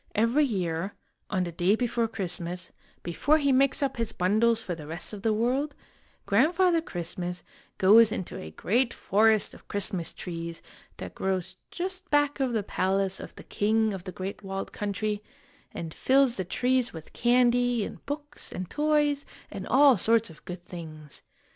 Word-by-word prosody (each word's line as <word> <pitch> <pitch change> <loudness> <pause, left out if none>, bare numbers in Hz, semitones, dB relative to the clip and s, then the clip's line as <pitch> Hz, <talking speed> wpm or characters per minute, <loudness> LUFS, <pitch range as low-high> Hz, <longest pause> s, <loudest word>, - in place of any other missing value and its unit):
Every 230 +7 +3
year, 185 -5 -2 0.3
on 185 -3 0
the 175 - -4
day 175 +5 +2
before 235 -1 0
Christmas, 180 -4 -4 0.3
before 290 - +2
he 280 -2 +2
makes 275 +2 +3
up 270 -2 -1
his 230 -2 -2
bundles 220 +5 +3
for 185 - -4
the 155 -3 -8
rest 165 +6 -4
of 205 - -7
the 220 - +2
world, 255 +7 0 0.5
Grandfather 335 - +3
Christmas 175 - -5 0.3
goes 215 +3 +7
into 190 -5 -4
a 80 - -7
great 235 - 0
forest 215 +1 +3
of - - -16
Christmas 190 -4 -2
trees, 170 -2 -6 0.3
that 90 - -7
grows 190 -1 -2
just 370 +2 -5
back 290 0 +2
of 265 -2 +1
the 220 -3 0
palace 195 0 0
of - - -9
the - - -11
king 220 +1 +1
of 185 -2 -7
The 185 - -5
Great 190 +3 -6
Walled 195 -1 -5
Country, 205 0 -2 0.5
and 160 -2 -6
fills 265 -2 +3
the 190 - -2
trees 250 +6 +1
with 160 -2 -10
candy 245 -2 +3
and - - -9
books 295 0 -5
and 185 0 -5
toys 295 -1 +2 0.3
and - - -6
all 275 -1 +6
sorts 230 -4 +3
of 155 - -17
good 180 -1 -8
things. 155 -5 -9
215 Hz, 165 wpm, -27 LUFS, 180-255 Hz, 0.5 s, goes